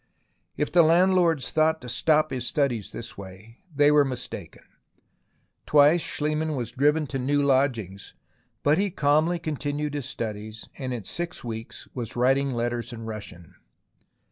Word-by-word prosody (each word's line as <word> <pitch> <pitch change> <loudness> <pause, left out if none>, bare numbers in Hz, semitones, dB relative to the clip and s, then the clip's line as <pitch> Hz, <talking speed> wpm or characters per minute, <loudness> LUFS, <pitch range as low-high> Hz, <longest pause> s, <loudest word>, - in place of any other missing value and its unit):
If 150 - -1
the 175 - +6
landlords 170 -2 +3
thought 160 0 +2
to 125 - -9
stop 155 +5 +2
his 125 -2 -3
studies 120 -8 -1
in - - -8
this 115 -3 -9
way, 100 +4 -12 0.2
they 145 +1 +5
were 150 -1 +6
mistaken. 130 -3 -6 1.0
Twice 150 +3 +5
Schliemann 155 +1 -1
was 120 -4 -3
driven 150 +3 +2
to 135 -1 -4
new 145 +3 +1
lodgings, 120 -9 0 0.5
but 150 +4 +3
he 200 0 +1
calmly 155 +2 +2
continued 150 -2 -3
his 145 -4 -4
studies, 110 -1 -6
and 130 -2 -4
in 120 -4 -4
six 175 - -5
weeks 115 -1 -7
was 120 -3 -4
writing 135 +3 +2
letters 120 0 -2
in 115 -1 -8
Russian. 100 -7 -8
140 Hz, 150 wpm, -25 LUFS, 115-155 Hz, 1.0 s, the